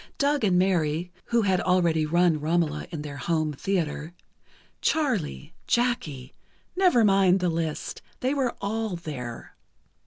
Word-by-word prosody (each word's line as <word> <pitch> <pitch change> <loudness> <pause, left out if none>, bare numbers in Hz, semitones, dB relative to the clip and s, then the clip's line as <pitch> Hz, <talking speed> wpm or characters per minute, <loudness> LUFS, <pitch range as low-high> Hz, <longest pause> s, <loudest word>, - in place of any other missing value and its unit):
Doug 285 -2 +1
and 185 -4 +3
Mary 175 -2 +1
(who 235 -1 +2
had 190 -3 +2
already 170 -4 +2
run 170 -1 +3
"Romola" 155 0 0
in 155 -4 -5
their 145 -1 -7
home 155 +1 0
theatre), 165 0 -2 0.7
Charlie, 210 - -1
Jackie... 165 - -1 0.4
never 355 - +4
mind 195 -2 +4
the 180 -1 +1
list, 160 -2 -3 0.2
they 260 +2 +1
were 265 -4 0
all 215 0 -2
there. 130 -8 -7
175 Hz, 130 wpm, -26 LUFS, 155-210 Hz, 0.7 s, never